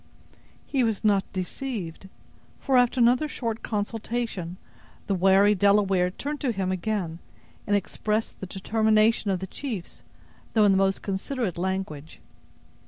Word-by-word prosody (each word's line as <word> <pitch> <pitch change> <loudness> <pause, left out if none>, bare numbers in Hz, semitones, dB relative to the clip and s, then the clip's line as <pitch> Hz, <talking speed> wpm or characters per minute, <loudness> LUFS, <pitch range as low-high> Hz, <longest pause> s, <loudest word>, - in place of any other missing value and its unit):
He 270 -3 +1
was 225 -3 0
not 200 -3 +2
deceived; 190 -2 -5 0.5
for, 270 - 0
after 245 +1 +4
another 245 +5 +4
short 230 -6 -3
consultation, 210 -4 -3 0.5
the 200 - 0
wary 195 +2 +5
Delaware 195 -2 +3
turned 290 +10 -5
to 265 -5 +1
him 190 -3 -1
again, 185 -3 -2 0.5
and 205 - +3
expressed 215 +2 -2
the 190 - -6
determination 215 +2 +2
of 185 -2 0
the - - -2
chiefs, 210 -3 -6 0.5
though 215 -2 +5
in 200 - +5
the 190 - +3
most 195 0 +1
considerate 200 - -2
language. 185 -5 -4
205 Hz, 135 wpm, -26 LUFS, 190-230 Hz, 0.5 s, wary